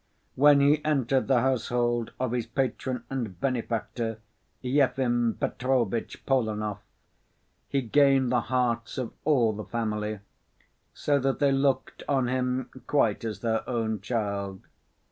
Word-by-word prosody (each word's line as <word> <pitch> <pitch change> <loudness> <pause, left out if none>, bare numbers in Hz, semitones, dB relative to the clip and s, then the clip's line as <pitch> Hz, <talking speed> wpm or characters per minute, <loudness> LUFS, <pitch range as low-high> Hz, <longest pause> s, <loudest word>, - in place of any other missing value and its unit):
When 145 +1 +6
he 145 +2 +4
entered 135 -3 +1
the 130 -3 +4
household 120 -2 0
of 130 -2 -1
his 120 -2 -2
patron 130 0 -2
and 115 -10 -4
benefactor, 115 -2 -2 0.5
Yefim 125 -3 +2
Petrovitch 125 -4 -1
Polenov, 105 -5 0 0.9
he 140 -1 0
gained 135 +1 +4
the 125 -1 +3
hearts 120 -2 0
of 125 -3 -3
all 125 -8 +3
the 105 +1 -6
family, 105 -2 -2 0.7
so 145 -1 +1
that 135 0 0
they 140 -2 +3
looked 135 0 0
on 135 -3 +2
him 125 0 -1 0.2
quite 115 -8 +2
as 110 -2 -4
their 110 -1 0
own 110 -3 -1
child. 100 -4 -3
125 Hz, 125 wpm, -27 LUFS, 115-135 Hz, 0.9 s, When